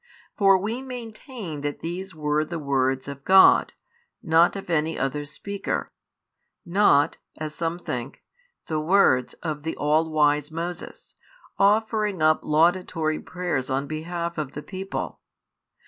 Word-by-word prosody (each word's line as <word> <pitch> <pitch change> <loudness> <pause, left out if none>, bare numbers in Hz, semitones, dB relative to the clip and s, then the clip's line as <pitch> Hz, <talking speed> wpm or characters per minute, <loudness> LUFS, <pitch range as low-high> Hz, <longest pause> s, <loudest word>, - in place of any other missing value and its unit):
For 195 -2 +5
we 220 +7 -3
maintain 230 - -7
that 145 0 -4
these 180 +2 -5
were 150 0 0
the 170 +2 -5
words 135 -3 0
of 140 -1 -8
God, 190 +4 +6 0.5
not 165 +3 +4
of 195 - -6
any 160 -1 0
other 140 +2 -2
speaker; 195 +8 -4 0.7
not 170 -6 +3 0.2
(as 155 -1 -5
some 165 +1 -2
think) 125 -6 -6 0.4
the 155 -1 -2
words 155 -7 +3
of 155 -3 -3
the 160 +2 -4
all 155 +2 +1
wise 150 -1 +2
Moses, 175 - -6 0.5
offering 210 -1 +2
up 155 0 +4
laudatory 160 0 +1
prayers 175 -8 -3
on 135 +1 -1
behalf 170 +2 -4
of 145 -3 -4
the 150 - -7
people. 190 0 -5
160 Hz, 130 wpm, -25 LUFS, 150-190 Hz, 0.7 s, God